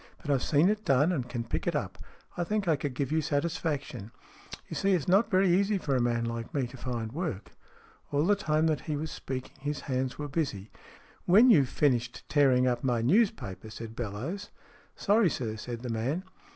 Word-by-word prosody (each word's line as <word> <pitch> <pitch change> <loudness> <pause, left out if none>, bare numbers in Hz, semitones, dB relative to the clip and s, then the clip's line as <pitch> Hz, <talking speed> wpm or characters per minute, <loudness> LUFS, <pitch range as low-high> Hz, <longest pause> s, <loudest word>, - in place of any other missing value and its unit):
But 145 - -3
I've 135 -3 +2
seen 150 +5 +3
it 215 0 -1
done 140 +6 +3
and 130 -8 -2
can 120 -2 -3
pick 115 - -3
it - - +1
up. - - -3 0.4
I 175 - -1
think 210 +1 -1
I 160 - +4
could 140 -2 -4
give 135 0 -2
you 160 0 +2
satis 155 +2 -1
faction. 140 -8 -4 0.6
You - - -6
see, 195 0 +2
it's 170 -6 0
not 195 +6 +4
very 190 -1 +3
easy 200 +2 +2
for 145 -7 -1
a 125 - +2
man 120 -1 +1
like 115 +2 -5
me 135 -3 +1
to 125 - -10
find 120 -4 -4
work." 120 - -4 0.6
All 145 +2 +2
the 205 +3 +4
time 155 -5 +1
that 155 -2 +1
he 150 - 0
was 155 +2 -4
speaking, 130 -1 -6
his 145 +1 -3
hands 130 -1 -2
were 150 - -4
busy. 135 - -3 0.6
"When 220 +8 +7
you've 140 - +5
finished 125 -4 0
tearing 135 -4 +4
up 125 -1 0
my 120 -3 +1
newspaper," 125 - +1
said 110 +1 -8
Bellowes. 125 - -5 0.2
" - - -27
Sorry, 210 -2 +3
sir," 115 -6 -3
said 115 +2 -6
the 125 - -4
man. 125 +10 -1
140 Hz, 210 wpm, -29 LUFS, 120-170 Hz, 0.6 s, When